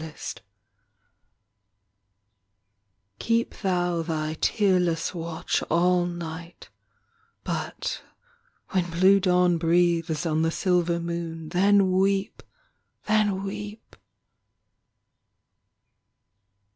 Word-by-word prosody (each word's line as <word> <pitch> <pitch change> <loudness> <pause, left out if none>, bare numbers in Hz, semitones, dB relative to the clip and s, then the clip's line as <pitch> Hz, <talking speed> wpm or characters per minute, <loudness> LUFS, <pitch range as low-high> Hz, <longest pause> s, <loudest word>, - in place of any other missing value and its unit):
34 160 -1 -9
ANGUISH - - -6 2.8
Keep 230 0 0
thou 175 -3 0
Thy 155 -2 -2
tearless 180 -5 +1
watch 170 0 -2
All 175 +1 +2
night 170 0 -8 0.7
but - - -4 0.7
when 180 -3 0
blue 185 +4 +4
dawn 180 -2 +2
Breathes 170 -1 +1
on 160 -1 +1
the 165 - +2
silver 175 -1 +1
moon, 170 -2 -5
then 195 +2 +3
weep! 195 +2 0 0.6
Then 210 -3 +1
weep! 205 +2 -7
175 Hz, 80 wpm, -25 LUFS, 165-190 Hz, 2.8 s, blue